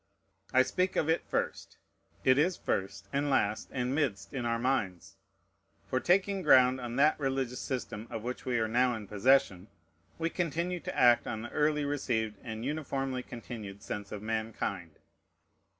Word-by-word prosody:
I 130 - +6
speak 185 +8 0
of 155 - +1
it 165 - -1
first. - - -3 0.5
It 130 +1 +5
is 175 +4 +2
first, 100 +1 -3
and 140 +1 +1
last, 110 -6 +1
and 125 0 -1
midst 110 -10 -1
in 125 -3 -2
our 115 0 +1
minds. 115 -8 -1 0.7
For, 130 - 0
taking 195 +5 +2
ground 130 -5 +5
on 120 -1 -5
that 150 +4 +4
religious 135 -3 -1
system 120 -4 -4
of 110 - -5
which 125 +1 -4
we 125 -2 0
are 110 -1 +1
now 125 +2 +2
in 110 -2 -7
possession, 105 -3 +3 0.5
we 165 0 -1
continue 175 +1 -1
to - - -6
act 120 -1 +5
on 110 -2 -4
the 120 - -7
early 150 0 +1
received 115 -7 -1
and 110 0 -6
uniformly 135 -3 -2
continued 110 -5 -8
sense 105 -3 -5
of 105 0 -6
mankind. 110 -7 -3
125 Hz, 165 wpm, -31 LUFS, 110-140 Hz, 0.7 s, I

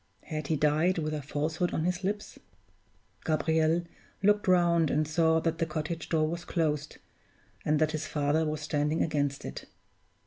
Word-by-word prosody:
Had 155 -2 -4
he 160 - +1
died 155 +5 +2
with 155 -1 -1
a 150 - -2
falsehood 155 +5 -1
on 155 - 0
his 180 +2 -1
lips? 205 +2 -3 0.8
Gabriel 160 +1 +2 0.4
looked 205 0 +3
round 170 -3 +4
and 155 +1 +1
saw 160 +1 +3
that 165 0 -1
the 165 - +1
cottage 160 +1 -4
door 155 -2 +2
was 170 +2 -4
closed, 150 -4 -1 0.7
and 150 0 +2
that 155 0 +2
his 155 0 -3
father 150 +1 +1
was 155 -1 -2
standing 150 +1 0
against 145 -3 -1
it. - - -6
155 Hz, 165 wpm, -29 LUFS, 150-170 Hz, 0.8 s, round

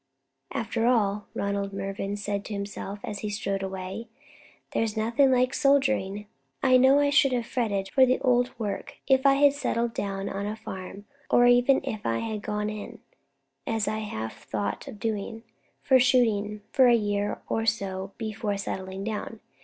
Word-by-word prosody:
"After 230 0 -1
all," 210 -4 +1
Ronald 200 0 -2
Mervyn 195 +1 -3
said 205 -1 -3
to 220 - -6
himself, 200 0 -5
as 205 - -5
he 210 - -3
strode 200 -2 -2
away, 190 +3 -5 0.7
"there's 220 -1 0
nothing 235 +5 +3
like 255 +1 +3
soldiering. 265 -8 +2 0.4
I 255 0 +6
know 265 +2 +6
I 285 0 +3
should 275 -1 +5
have 240 -2 0
fretted 205 -6 -1
for 265 - +5
the 255 0 +4
old 245 -1 +3
work 210 -4 -4
if 265 0 +4
I 275 - +6
had 285 0 +5
settled 235 -4 -1
down 195 -2 -3
on 200 +1 -3
a 210 - -3
farm, 195 -2 -8 0.2
or 245 - +5
even 245 +2 +5
if 215 -2 -4
I 115 0 0
had 215 - -3
gone 210 0 -2
in, 210 -1 -7 0.7
as 225 -2 0
I 215 +1 -1
half 110 - -6
thought 105 -1 -3
of 210 - -9
doing, 225 +1 -3 0.4
for 260 -1 +5
shooting 215 -5 +2
for 260 -2 +5
a 240 - +6
year 205 -2 -1
or 225 0 -1
so 195 -3 -2
before 215 -2 -3
settling 190 0 -5
down. 220 +1 -4
215 Hz, 170 wpm, -27 LUFS, 200-245 Hz, 0.7 s, I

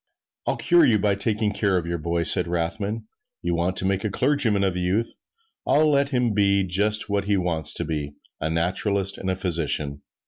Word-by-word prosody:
"I'll - - +1
cure 175 -1 +4
you, 110 - +4
by 105 0 +1
taking 105 +1 -1
charge 100 -3 +1
of 85 - -7
your 85 0 -3
boy," 85 +1 -1
said 85 +1 +5
Rothman; 100 +6 -3 0.4
"you 85 - 0
want 85 +2 -1
to - - -1
make 95 0 0
a 110 - 0
clergyman 115 -3 +1
of 95 -2 +1
the 90 - -3
youth: 100 +6 0 0.5
I'll 155 +1 +3
let 140 -1 +2
him 125 -5 +1
be 100 -1 +3
just 105 +4 0
what 100 -1 -1
he 100 -1 +1
wants 85 -4 0
to - - -3
be, 75 -2 -4 0.2
a 80 - -2
naturalist 95 +4 -1
and 95 - -3
a 95 - 0
physician." 80 -6 -2
95 Hz, 205 wpm, -24 LUFS, 85-105 Hz, 0.5 s, said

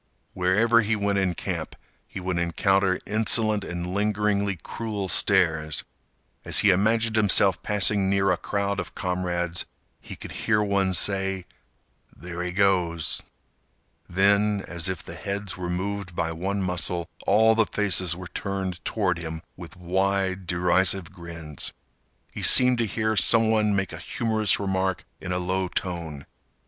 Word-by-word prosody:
Wherever 105 +6 +3
he 110 +1 0
went 100 -1 0
in 95 -2 0
camp, - - -5 0.3
he - - -7
would 90 -1 -2
encounter 95 +2 +1
insolent 110 -1 +3
and 90 0 -5
lingeringly 100 -1 0
cruel 105 -4 -4
stares. 85 -4 +2 0.6
As - - +4
he 105 - +5
imagined 110 +4 +2
himself 100 -3 +4
passing 100 -1 +2
near 100 -1 +2
a 90 - +1
crowd 100 -1 -2
of - - -6
comrades, 90 -1 -2 0.3
he - - -10
could - - -10
hear 105 -1 0
one 100 -2 +1
say, 95 -1 0 0.7
"There 85 +3 -7
he 90 0 -3
goes!" 90 -4 0 0.9
Then, 100 +2 +2
as 85 +1 -2
if 95 -3 -4
the - - -8
heads 100 0 -4
were 90 -1 -5
moved 95 0 -4
by 80 -1 -1
one 95 +4 -3
muscle, 90 -1 -1 0.2
all 110 +2 +5
the 110 -1 +2
faces 95 -4 +2
were 90 0 -8
turned 95 -3 -4
toward 95 -6 -1
him 80 -1 -6
with 90 -1 -11
wide, 95 +1 -1
derisive 90 +1 +1
grins. 85 -4 -6 0.6
He - - -7
seemed 125 -2 +7
to 115 - +1
hear 110 +1 -1
some 110 +1 +3
one 105 -2 +2
make 95 -2 -2
a - - -7
humorous 110 -3 0
remark 95 -2 -1
in 90 - -6
a 90 - 0
low 95 +1 -1
tone. 85 -7 -5
95 Hz, 150 wpm, -25 LUFS, 90-105 Hz, 0.9 s, seemed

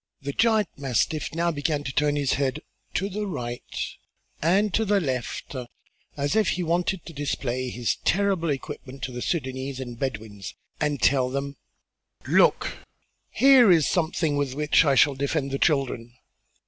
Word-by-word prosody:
The 140 +1 -4
giant 220 -3 +3
mastiff 140 +4 -1
now 170 +1 +1
began 145 -1 -1
to 135 - -5
turn 145 +1 +2
his 140 -2 +1
head 140 +3 -1 0.3
to 195 - 0
the 205 +1 -4
right 120 -9 -4 0.8
and 195 +5 +2
to 220 - +2
the 205 -1 +2
left 130 -3 -3 0.6
as 145 +4 0
if 215 -3 +3
he 180 - -1
wanted 175 +2 0
to 165 - -9
display 130 -3 -2
well - - -6
his 120 -1 0
terrible 190 -4 +1
equipment 135 -1 -5
to 130 - -3
the 125 - -6
Sudânese 130 -2 -3
and 120 -3 -7
Bedouins 105 -7 -5 0.2
and 150 -2 0
tell 130 -2 +3
them: 140 +1 -3 0.7
"Look! - - +3 0.5
here 260 -6 +6
is 160 -4 +4
something 160 -3 0
with 140 -2 -1
which 150 +2 +4
I 140 -2 +3
shall 145 +1 +5
defend 140 +1 -2
the 135 - -2
children!" 125 -6 0
145 Hz, 160 wpm, -25 LUFS, 130-170 Hz, 0.8 s, here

